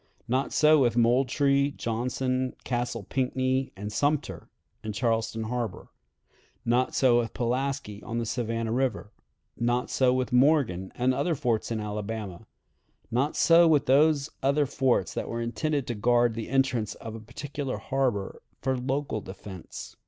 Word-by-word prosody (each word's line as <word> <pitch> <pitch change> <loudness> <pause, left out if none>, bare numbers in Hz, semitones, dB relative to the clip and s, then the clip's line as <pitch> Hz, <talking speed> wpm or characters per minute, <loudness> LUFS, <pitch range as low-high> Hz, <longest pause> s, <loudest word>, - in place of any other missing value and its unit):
Not 130 +3 0
so 155 0 +5
with 120 -3 +2
Moultrie, 140 +4 +3
Johnson, 125 +2 -1
Castle 120 -3 -2
Pinckney, 130 +3 -1
and 105 +2 -6
Sumter, 145 +6 -1 0.3
in 110 -1 -4
Charleston 115 0 0
Harbor; 115 -2 -4 0.8
not 125 +2 +1
so 125 -3 +4
with 115 -2 -3
Pulaski, 125 -3 -2
on 115 0 -5
the 115 - -1
Savannah 115 -1 -2
River; 125 -4 -1 0.5
not 120 +1 0
so 130 -2 +3
with 130 0 -1
Morgan 125 - +3
and 125 +1 +2
other 150 +6 0
forts 120 -6 -1
in 115 -2 -2
Alabama; 105 -3 -5 0.6
not 130 +6 0
so 170 0 +6
with 150 -4 +3
those 145 +2 +3
other 140 +2 +2
forts 130 -7 +1
that - - -4
were 115 - -3
intended 140 +4 -1
to 120 - -3
guard 120 +2 +2
the 115 -1 -5
entrance 130 -5 +1
of 110 - -8
a 115 - -7
particular 135 +4 -5
harbor 125 -8 -2 0.2
for 130 0 0
local 130 -2 -2
defense.... 95 -2 -9
125 Hz, 145 wpm, -27 LUFS, 115-135 Hz, 0.8 s, so